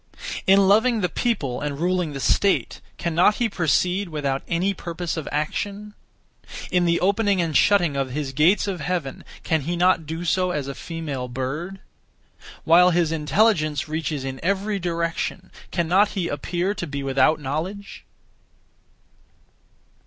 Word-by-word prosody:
In 195 0 +6
loving 220 +3 +3
the 180 - 0
people 165 - -1
and 145 -1 -3
ruling 180 -2 0
the 140 - -5
state, 195 +9 +1 0.2
cannot 170 +5 +2
he 240 - +1
proceed 180 0 0
without 140 -4 -2
any 180 +4 0
(purpose 170 -2 -5
of) 160 -4 -5
action? 200 +8 -3 0.8
In 180 -1 +2
the 170 0 +2
opening 200 0 +2
and 165 -3 -1
shutting 175 -6 +4
of 135 -1 -1
his 135 0 -4
gates 165 +10 +3
of 185 -5 -3
heaven, 160 -3 -3 0.2
cannot 175 +4 +2
he 160 - -14
do 165 +3 -5
so 180 +2 +1
as 150 -6 -3
a 140 - -4
female 150 -6 -5
bird? 150 +10 -5 0.8
While 180 +2 +6
his 170 -2 +1
intelligence 155 -1 +1
reaches 155 -2 -3
in 130 0 -5
every 200 +3 -1
direction, 170 +1 -3 0.2
cannot 185 +4 +2
he 170 -3 -1
(appear 175 +7 -2
to) 175 - -5
be 140 -1 -4
without 135 +3 +2
knowledge? 165 +9 -5
170 Hz, 145 wpm, -23 LUFS, 150-190 Hz, 0.8 s, In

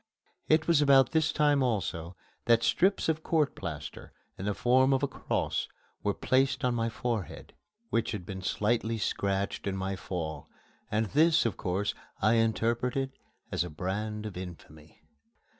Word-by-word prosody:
It 155 0 +3
was 165 -3 +4
about 135 -3 +5
this 160 -1 +2
time 145 -2 +3
also 95 -8 -1 0.3
that 115 0 +4
strips 190 +10 +2
of 160 -1 0
court 155 -3 +1
plaster, - - -7 0.2
in 95 - -6
the 105 -1 0
form 130 +2 +4
of 135 - +1
a - - +3
cross, 130 - -2 0.3
were 100 -1 0
placed 135 +1 +1
on 125 - +2
my 115 -1 0
forehead, 115 -3 -4 0.4
which 115 -1 +1
had 100 -5 -5
been 95 0 -6
slightly 110 +4 0
scratched 100 -2 -1
in 95 -1 -1
my 95 +1 -2
fall, 80 -6 -5 0.4
and 110 +1 +1
this, 160 +1 +4
of 115 - 0
course, 95 +3 -1 0.3
I 110 - +3
interpreted 120 +4 +1 0.4
as - - +1
a 90 - -6
brand 105 +6 -3
of 105 - -6
infamy. 80 -4 -10
115 Hz, 160 wpm, -29 LUFS, 95-135 Hz, 0.4 s, about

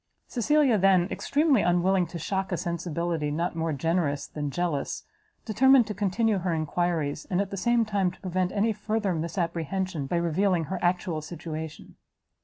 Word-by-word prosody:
Cecilia 270 -2 +2
then, 185 -2 +4
extremely 290 -5 +2
unwilling 180 +1 +2
to 170 - -7
shock 190 +3 -2
a 175 - 0
sensibility 170 -2 -2
not 165 +4 -2
more 165 0 -1
generous 150 0 0
than 145 -1 -4
jealous, 160 -2 -2 0.4
determined 260 +3 +5
to 210 - -4
continue 205 +1 +1
her 175 -2 -1
enquiries, 155 -1 -1
and, 180 - +1
at 200 -1 -1
the - - -3
same 235 +4 +2
time, 200 -4 +1
to 180 - -13
prevent 185 0 -1
any 220 +2 +1
further 210 -2 -1
misapprehension, 170 -1 -2
by 175 - -1
revealing 170 +1 +1
her 185 +4 -4
actual 175 -2 0
situation. 160 -1 -7
180 Hz, 160 wpm, -27 LUFS, 165-200 Hz, 0.4 s, determined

